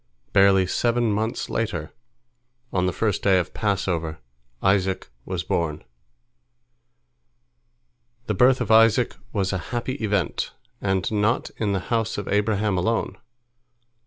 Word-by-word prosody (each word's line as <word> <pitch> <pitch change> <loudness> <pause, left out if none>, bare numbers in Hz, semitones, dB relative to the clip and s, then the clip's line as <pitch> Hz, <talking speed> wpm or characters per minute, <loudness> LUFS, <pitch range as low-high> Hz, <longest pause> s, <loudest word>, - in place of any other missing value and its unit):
Barely 95 -1 +5
seven 120 +4 +1
months 110 +4 -2
later, 85 -9 -3 0.8
on 90 -1 +1
the - - +1
first 105 +1 -1
day 95 -2 +4
of 90 - +1
the - - -24
Passover, 90 -6 -1 0.5
Isaac 95 -6 +1
was 90 -2 -3
born. 80 -3 -2 2.4
The 105 - -1
birth 125 +6 +4
of 110 -3 -1
Isaac 115 +2 +5 0.2
was 100 -2 -1
a 95 - -1
happy 120 +2 -2
event, 100 -4 -1 0.3
and 95 -1 0
not 110 +3 +1
in 105 -3 0
the 95 - 0
house 115 -1 0
of 100 - -4
Abraham 105 -1 +1
alone. 115 +5 0
100 Hz, 130 wpm, -24 LUFS, 95-110 Hz, 2.4 s, Barely